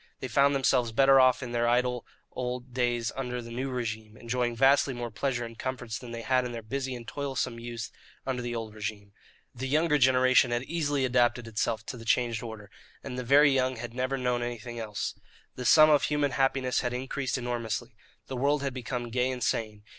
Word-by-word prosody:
They 130 - -4
found 140 +3 +3
themselves 125 -3 +2
better 135 +3 +6
off 130 0 +4
in 120 - -6
their 120 0 +1
idle 125 0 +1 0.2
old 125 0 -5
days 120 -2 0
under 125 -2 -3
the 115 -1 -8
new 130 +3 -3
regime, 110 -3 -4
enjoying 120 0 -1
vastly 135 +1 +4
more 120 -1 -5
pleasure 120 +2 -2
and 115 0 -9
comforts 120 -3 -4
than 125 - -10
they 115 0 -6
had 130 0 +2
in 125 -1 -5
their 115 -1 -6
busy 130 +3 -3
and 120 -1 -9
toilsome 130 -2 -3
youth 115 -1 -6 0.3
under 130 -2 -2
the 120 0 -3
old 110 -2 -5
regime. 105 -2 -6 0.4
The 130 +2 -4
younger 150 +2 +2
generation 130 -1 +5
had 120 +1 -1
easily 145 -3 0
adapted 120 -1 +2
itself 110 0 -2
too 125 - -6
the 115 - -10
changed 115 +1 +1
order, 110 -4 -8 0.3
and 125 - -6
the 125 - -3
very 140 +4 +6
young 130 -1 +1
had 120 0 -7
never 130 +2 -1
known 125 -1 0
anything 120 0 -5
else. 105 -2 -3 0.4
The 125 - -6
sum 155 +2 +7
of 145 -2 +5
human 145 -1 +1
happiness 135 -1 +1
had 125 -1 -2
increased 130 +1 -2
enormously. 120 -1 -3 0.3
The 130 - -5
world 140 +2 +1
had 135 -2 -2
become 125 -1 -4
gay 125 +2 +1
and 125 -2 -3
sane. 110 -2 -2
125 Hz, 205 wpm, -28 LUFS, 115-130 Hz, 0.4 s, sum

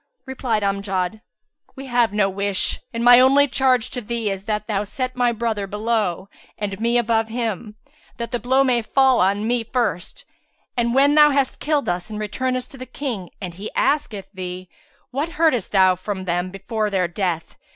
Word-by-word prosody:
Replied 250 -5 -2
Amjad, 195 0 -1 0.5
"We 270 0 -8
have 240 -3 +2
no 205 -1 +2
wish; 195 0 -1
and 230 0 -3
my 245 0 +8
only 275 +3 +5
charge 255 -3 +2
to 250 - -4
thee 230 -1 -2
is 195 0 -6
that 210 -1 -2
thou 205 -2 -1
set 255 +5 -4
my 245 -1 +2
brother 225 -3 -2
below 210 -3 -1 0.3
and 200 -2 -4
me 235 +1 +2
above 225 -1 +1
him, 220 -2 -3 0.4
that 235 0 -5
the 245 - -1
blow 260 +4 +3
may 250 -3 +2
fall 265 +2 +3
on 200 +3 +1
me 240 0 +1
first, 240 - -2 0.5
and 235 0 0
when 280 +2 +5
thou 300 0 +7
hast 275 -2 0
killed 300 -2 0
us 175 +3 -2
and 215 - -6
returnest 255 +4 -2
to 270 - -12
the 255 - -7
King 235 - -5
and 180 -3 -6
he 200 +5 -7
asketh 225 -9 0
thee, 185 -1 -6 0.4
'What 295 +6 -3
heardest 305 - +1
thou 190 -2 +5
from 190 +1 -5
them 175 +1 -1
before 210 +3 -3
their 190 -3 +1
death?' 170 -2 -3
225 Hz, 185 wpm, -21 LUFS, 195-255 Hz, 0.5 s, my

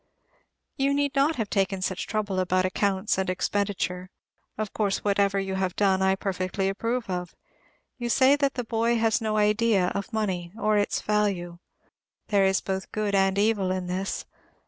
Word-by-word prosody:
You 275 0 +2
need 285 0 0
not 285 +3 +2
have 220 -5 -3
taken 195 -1 0
such 185 -1 -2
trouble 205 -3 -1
about 185 0 +1
accounts 190 +1 0
and 190 - -1
expenditure; 185 -1 -1 0.5
of 215 -1 -3
course, 205 -3 -1
whatever 200 -1 +2
you 195 0 -3
have 190 -1 -1
done 190 -2 +2
I 190 0 +3
perfectly 190 0 -2
approve 230 +4 -2
of. 180 -2 -4 0.6
You 240 -1 -3
say 265 +3 +5
that 280 -1 0
the 250 - -2
boy 230 +1 +1
has 225 -1 +2
no 215 -1 0
idea 210 -3 +3
of 200 +4 -4
money 190 -6 -2
or 215 -1 +2
its 205 -1 +1
value. 195 -5 -1 0.7
There 200 -2 +4
is 190 0 +2
both 190 0 -4
good 210 -1 -1
and 195 0 +3
evil 205 -2 +2
in 185 -1 -2
this. 185 +2 -3
200 Hz, 170 wpm, -26 LUFS, 190-220 Hz, 0.7 s, say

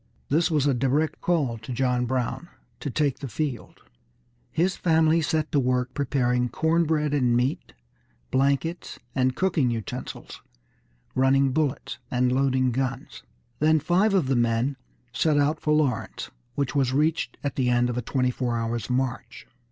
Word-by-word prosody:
This 160 +4 +2
was 150 -4 +1
a 140 - +3
direct 135 +5 0
call 140 -10 0
to 115 +3 -8
John 125 0 0
Brown 130 +7 -2 0.3
to 145 - -4
take 145 0 0
the 140 - -5
field. 130 +1 -5 0.7
His 180 +3 0
family 160 -1 +3
set 155 0 -1
to 145 - +3
work 125 -1 0
preparing 125 -3 0
corn 165 +6 +1
bread 150 -2 0
and 125 -4 +2
meat, 125 - -1 0.6
blankets 140 +6 0 0.2
and 130 -1 +1
cooking 165 -9 +1
utensils, 115 -3 -6 0.7
running 135 +1 +3
bullets, 145 -2 -2
and 125 0 +1
loading 130 -1 +2
guns. 130 +2 -3 0.4
Then 155 +1 +4
five 185 +7 +2
of 180 -7 +3
the 135 0 +1
men 120 +3 +1 0.4
set 155 -2 +2
out 145 +2 +2
for 150 - -1
Lawrence, 145 -7 0 0.2
which 140 -2 -1
was 135 -3 +1
reached 155 +3 0
at 140 -2 -2
the 125 -2 +1
end 120 0 +3
of 125 - -3
a 125 - -1
twenty 125 +1 0
four 120 -2 -2
hours' 115 0 -3
march. 130 0 -2
135 Hz, 160 wpm, -25 LUFS, 125-155 Hz, 0.7 s, Then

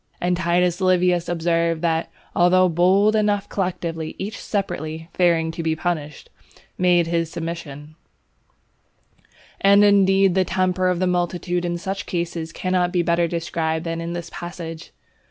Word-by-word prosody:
And 180 0 +1
Titus 175 +1 +1
Livius 180 -2 +2
observes 165 -1 0
that, 165 -1 0 0.3
"although 185 +1 +4
bold 190 +5 +3
enough 205 -2 +1
collectively, 170 -4 -3
each 200 +2 -5
separately, 165 -5 -4
fearing 165 -2 +2
to 165 - -5
be 160 -1 0
punished, 155 -3 -4 0.4
made 175 -2 +3
his 165 -1 -1
submission." 160 -3 -7 1.7
And 200 +1 +5
indeed 195 -2 +4
the 190 +1 +3
temper 185 0 0
of 180 -1 +1
the 185 - 0
multitude 175 0 -1
in 175 0 -2
such 190 +2 -5
cases, 170 -2 -3
cannot 180 0 0
be 175 -2 +1
better 170 0 +2
described 165 -1 -2
than 165 0 -3
in 170 +1 -4
this 170 -1 -6
passage. 170 -2 -7
175 Hz, 140 wpm, -22 LUFS, 165-185 Hz, 1.7 s, And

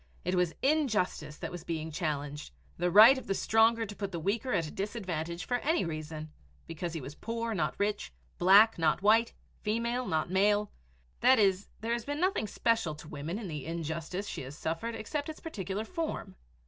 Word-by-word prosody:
It 180 - 0
was 180 -2 +1
injustice 215 - +1
that - - -5
was 175 -2 -7
being 160 -2 -4
challenged 150 -3 -3 0.3
the 175 +1 0
right 225 +8 +9
of - - -13
the 195 - 0
stronger 225 +2 +3
to 205 -1 -8
put 200 -1 -4
the 170 - -4
weaker 215 +9 -1
at 170 -7 +1
a 150 - -7
disadvantage 180 -5 -4
for 245 - 0
any 315 - +1
reason 155 -1 -5 0.3
because 165 +1 -5
he 165 - -4
was 135 +3 -7
poor, 230 +6 -3
not 155 -7 -1
rich; 205 0 -1 0.3
black, 200 +3 +6
not 160 +3 +2
white; 225 +3 +4 0.3
female, 235 +3 -1
not 160 +2 -1
male, 205 +2 +2 0.5
that 260 +1 +6
is, 195 -2 +2
there 230 +1 -1
has 235 -1 -2
been 290 +1 -3
nothing 365 - +1
special 225 -9 0
to 150 - -12
women 155 +6 -5
in 220 -3 -5
the 150 -5 -5
injustice 165 +4 -4
she - - -5
has 135 +3 -8
suffered 165 +9 -3
except 290 +7 -4
its 310 - -7
particular 205 - -4
form. 330 +3 -4
195 Hz, 190 wpm, -30 LUFS, 160-230 Hz, 0.5 s, right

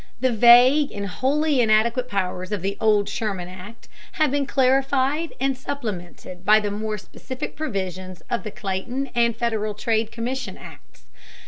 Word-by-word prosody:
The 260 +1 +2
vague 245 +6 +6
and 200 -1 -5
wholly 275 - +1
inadequate 235 +3 +2
powers 185 -1 -3
of 205 -4 -3
the 200 +1 -1
old 210 -2 +3
Sherman 195 -5 -3
Act 185 +5 -11 0.3
have 310 -4 +1
been 285 -1 0
clarified 270 +4 +1
and 270 +1 +1
supplemented 195 -9 -6
by 215 +3 +6
the 205 -1 -3
more 215 +1 -3
specific 255 +5 -7
provisions 185 - -5
of 240 - -1
the 215 - -6
Clayton 215 +8 -4
and 235 -1 +2
Federal 215 -3 -1
Trade 220 0 0
Commission 235 -3 -4
Acts. - - -15
225 Hz, 150 wpm, -23 LUFS, 200-260 Hz, 0.3 s, vague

